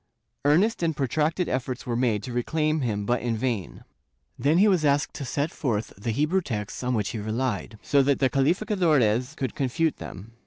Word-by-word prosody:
Earnest 180 +11 +3
and 160 -3 0
protracted 155 +6 0
efforts 130 0 -3
were 120 -2 -2
made 115 -4 +1
to 125 - -6
reclaim 155 +5 0
him 105 -5 -1
but 120 +3 +1
in 120 -2 -1
vain. 115 -5 -3 0.5
Then 150 +4 +2
he 205 +4 +6
was 185 -6 +3
asked 140 -3 +2
to 140 - -5
set 145 +5 -1
forth 115 -6 -2
the 105 +5 -5
Hebrew 150 - +1
texts 105 - -4
on 125 0 0
which 105 -2 0
he 110 - -4
relied, 110 0 -2
so 140 -1 +4
that 140 0 +2
the 135 - +3
calificadores 145 - +2
could 130 -6 -3
confute 145 +4 0
them. 100 +5 -9
130 Hz, 190 wpm, -26 LUFS, 115-155 Hz, 0.5 s, he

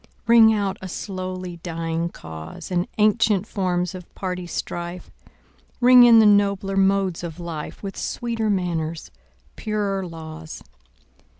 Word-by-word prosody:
Ring 230 -1 +7
out 200 -3 -1
a 190 - -6
slowly 185 -1 -5
dying 165 0 -3
cause, 80 - -9
And 175 0 0
ancient 210 -2 +3
forms 180 -4 -1
of 180 -2 -10
party 180 -2 -4
strife; 175 +1 -5 0.7
Ring 250 0 +8
in 235 -1 +8
the 220 - +7
nobler 200 -1 +3
modes 195 -2 +1
of 170 0 -6
life, 170 0 -7
With 195 -1 -5
sweeter 230 -2 -2
manners, 170 -4 -2 0.4
purer 205 -3 -2
laws. 160 -1 -9
185 Hz, 125 wpm, -23 LUFS, 170-205 Hz, 0.7 s, Ring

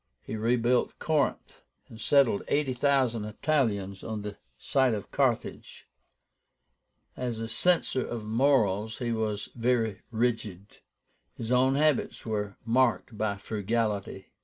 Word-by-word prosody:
He - - -5
rebuilt 120 +2 +1
Corinth, 150 -3 -1 0.3
and 110 - -12
settled 135 -7 +4
eighty 145 -3 +1
thousand 125 -4 +1
Italians 105 -6 -1
on 110 -2 -4
the 105 -1 -5 0.2
site 130 - +2
of 100 - -7
Carthage. - - -1 1.3
As 120 -3 -3
a 115 - -3
censor 130 +2 +2
of 115 -3 -5
morals 110 -3 +2
he 120 -1 -2
was 105 -2 -2
very 115 -4 0
rigid. 110 -4 -2 0.6
His 115 0 -5
own 130 +2 +4
habits 150 -2 +1
were 105 -3 -3
marked 120 -1 +1
by 105 -1 -1
frugality. 105 -2 -2
115 Hz, 120 wpm, -28 LUFS, 105-130 Hz, 1.3 s, settled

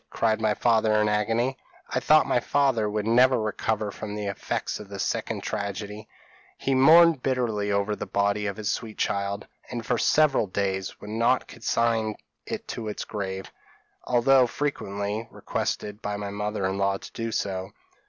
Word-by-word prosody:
cried 110 -1 +1
my 110 -1 +2
father, 110 -2 +3
in 105 - +3
agony. 115 +5 +1 0.4
"I - - +1
thought 155 +4 +5
my - - +2
father 125 -4 +1
would 105 0 -2
never 125 +2 +5
recover 110 0 -1
from 105 +1 -6
the 105 -1 -4
effects 100 0 -3
of 105 -2 -10
this 100 -1 -3
second - - -2
tragedy; 105 +1 -4 0.5
he 135 - 0
mourned 160 +3 +7
bitterly 115 -6 0
over 100 +1 +1
the - - -6
body 100 +1 +1
of 100 - -4
his 105 -2 -1
sweet 110 -2 -5
child, 100 +1 -1 0.2
and 120 -2 -5
for 120 - 0
several 150 -8 +3
days 95 0 -2
would 105 - -8
not 115 +3 +2
consign 115 -1 0 0.3
it - - -5
to 110 - -4
its 105 - -4
grave, 95 -2 -5 0.5
although 125 +1 +4
frequently 105 -6 -3
requested 105 0 -3
by 105 0 -3
my 100 -1 -4
mother 105 -1 -2
in 95 +1 -1
law 100 0 +1
to - - -11
do 115 0 -3
so. 95 -2 -2
105 Hz, 170 wpm, -26 LUFS, 100-120 Hz, 0.5 s, mourned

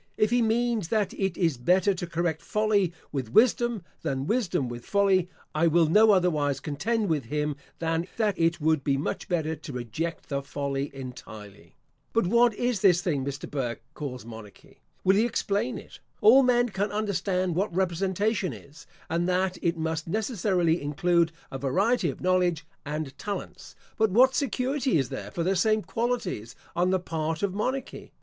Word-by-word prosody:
If 215 0 +2
he 245 0 +3
means 230 -3 +1
that 210 -1 0
it 190 -3 -2
is 165 -7 +1
better 185 +9 +3
to 175 -1 -5
correct 170 -2 -1
folly 210 -4 +1 0.2
with 130 -6 -3
wisdom, 240 - +3 0.2
than 135 -4 -2
wisdom 185 - 0
with 120 0 -7
folly, 195 -3 +2 0.2
I 160 +2 +3
will 165 +1 +4
no 210 +8 +5
otherwise 160 -8 +2
contend 205 +10 -1
with 150 -7 0
him, 150 +3 -2 0.2
than 165 +1 -1
that 215 -3 +1
it 165 0 +2
would 155 -2 +1
be 135 -1 +1
much 145 - -3
better 160 -3 0
to 150 -1 -9
reject 125 +8 -4
the 140 -1 -1
folly 140 0 -3
entirely. 110 -6 -10 0.4
But 230 - +2
what 235 +3 +4
is 245 -4 -1
this 180 -3 +4
thing 150 -8 0
which 140 0 -3
Mr. - - -9
Burke 120 -5 -3
calls 130 -6 -6
monarchy? 110 -3 -12 0.2
Will 190 +1 +4
he 215 - +4
explain 230 0 -1
it? - - -12 0.2
All 245 +6 +7
men 245 -1 +3
can 205 0 -2
understand 190 -3 -1
what 195 +5 0
representation 190 - 0
is; 140 - -14 0.2
and 170 +2 0
that 185 0 0
it 170 -1 0
must 160 0 -2
necessarily 185 -4 0
include 165 +3 +1 0.2
a 135 - -5
variety 190 - +1
of 135 - -7
knowledge 180 -3 +1 0.2
and 150 -2 -4
talents. 205 -1 -6 0.2
But 220 0 +4
what 255 +7 +5
security 265 - 0
is 135 -4 0
there - - -6
for 170 - -3
the 190 +3 +1
same 215 +3 +2
qualities 225 - -2 0.2
on 180 +1 +2
the 190 0 +2
part 160 -1 -3
of 195 -2 0
monarchy? 255 +6 -4
175 Hz, 175 wpm, -27 LUFS, 150-210 Hz, 0.4 s, All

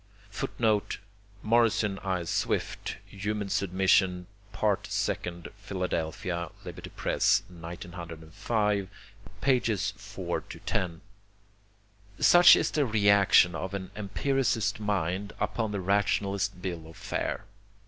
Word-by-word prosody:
[Footnote: 110 0 0 0.5
Morrison 110 -3 +2
I. 95 -3 -2
Swift, 85 - -2
Human 105 0 -3
Submission, 95 -2 +2 0.3
Part 105 -1 0
Second, 85 -1 -2
Philadelphia, 90 -3 -3 0.2
Liberty - - -8
Press, - - +2
1905, 85 +4 -3 0.5
pp. 120 -7 +2
4 - - -4
10.] 85 -3 -3 1.2
Such 175 0 +8
is - - 0
the 145 -3 +1
reaction 100 -4 +5
of 95 +4 -4
an 95 -1 -6
empiricist 110 0 0
mind 100 -1 -1
upon 110 -3 -1
the 100 - -2
rationalist 100 0 0
bill 85 -4 -4
of 80 - -13
fare. - - -3
100 Hz, 95 wpm, -28 LUFS, 90-105 Hz, 1.2 s, Such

